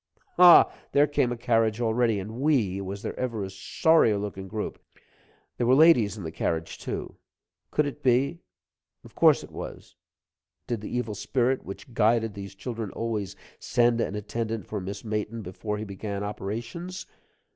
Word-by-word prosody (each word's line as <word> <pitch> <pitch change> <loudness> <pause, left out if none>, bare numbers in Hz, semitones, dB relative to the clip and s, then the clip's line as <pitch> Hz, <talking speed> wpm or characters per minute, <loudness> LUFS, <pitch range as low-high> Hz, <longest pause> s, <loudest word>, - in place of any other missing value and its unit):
Ha! 175 -2 +8 0.2
There 145 +1 +6
came 140 -4 +1
a 120 - -3
carriage 115 -2 +1
already, 115 -2 +1
and 110 +5 -7
we 115 -11 +2
was 100 +1 -6
there - - -4
ever 115 -5 -2
a 95 - -5
sorrier 110 +4 +3
looking 100 -1 -5
group? 105 +2 -5 0.8
There 120 - 0
were 130 - +6
ladies 135 -9 +5
in 100 - -7
the 80 - -5
carriage, 80 0 -3
too - - -5 0.5
could 150 - +1
it 145 +1 -5
be 135 +5 +2 0.6
of - - -15
course - - +5
it - - -12
was - - -9 0.7
did 120 -4 -3
the - - -6
evil 125 -3 -2
spirit, 125 +5 0
which 100 +5 -9
guided 115 0 +2
those 100 -1 -8
children 115 0 -5
always, 110 -5 -3 0.2
send 120 -1 +2
an 105 - -2
attendant 110 +1 -3
for 105 -2 -4
Miss 100 +2 -6
Mayton 110 +1 -3
before 105 +3 -4
he 105 - -4
began 100 0 -5
operations? 120 - -5
110 Hz, 165 wpm, -27 LUFS, 100-125 Hz, 0.8 s, Ha